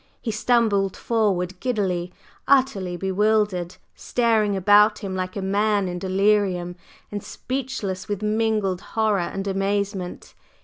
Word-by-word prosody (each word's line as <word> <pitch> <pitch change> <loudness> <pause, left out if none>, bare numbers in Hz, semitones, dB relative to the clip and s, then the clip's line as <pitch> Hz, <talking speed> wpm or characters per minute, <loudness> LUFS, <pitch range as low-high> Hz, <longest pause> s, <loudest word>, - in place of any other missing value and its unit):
He 230 - -3
stumbled 215 -3 +1
forward 190 -5 0
giddily, 185 -8 -1 0.4
utterly 195 -10 +2
bewildered, 195 -2 +1 0.2
staring 220 -4 +1
about 205 +3 +5
him 190 -1 -3
like 185 0 -3
a 200 - -3
man 205 0 +1
in 180 0 -4
delirium, 190 -2 +1 0.4
and 205 -1 -4
speechless 250 -8 -4
with 205 0 -3
mingled 215 -3 0
horror 215 -3 0
and 195 +3 -3
amazement. 195 -1 -2
200 Hz, 120 wpm, -23 LUFS, 185-215 Hz, 0.4 s, about